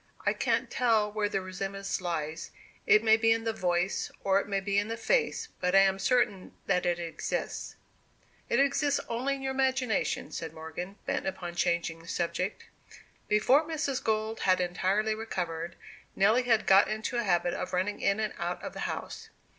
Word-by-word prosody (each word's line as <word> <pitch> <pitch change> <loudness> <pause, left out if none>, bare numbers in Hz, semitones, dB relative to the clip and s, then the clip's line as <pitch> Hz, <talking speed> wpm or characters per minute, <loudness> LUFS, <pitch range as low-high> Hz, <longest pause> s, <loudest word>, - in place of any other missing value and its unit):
I - - +3
can't - - 0
tell 225 -4 +2
where 210 -1 0
the 195 - -1
resemblance 195 +1 -4
lies 165 -2 -3 0.4
it 215 +1 +6
may 220 0 +6
be 225 0 +3
in 225 0 +2
the 225 -1 -1
voice, 180 -3 0
or 195 0 +3
it - - -5
may 200 -1 0
be 200 +1 +1
in 205 - -2
the 230 +1 -4
face, 460 - 0
but 180 +1 +1
I 195 - +8
am 195 0 +3
certain 205 -4 +1
that 180 0 +1
it 175 -1 +1
exists." 170 -1 -4 0.7
"It - - +2
exists 280 +1 +2
only 255 +4 -1
in 270 - -8
your 265 - -1
imagination," 260 -4 0
said 160 -1 -5
Morgan, 160 +4 -6
bent 275 +1 -1
upon 175 -11 -4
changing 170 -1 0
the 165 - -15
subject. 180 +3 -2 0.6
Before 250 +8 +4
Mrs. 300 -4 -2
Gold 220 0 -1
had 185 -1 +3
entirely 190 +4 +1
recovered, 175 -6 -4 0.4
Nelly 215 +6 +4
had 225 -3 +3
got 195 +1 +6
into 215 +3 -3
a 235 - +1
habit 175 -3 +1
of - - -4
running 185 +3 -1
in 200 +2 +2
and 215 -1 -1
out 175 +1 -2
of - - -5
the - - -8
house. - - -6
200 Hz, 185 wpm, -29 LUFS, 180-230 Hz, 0.7 s, I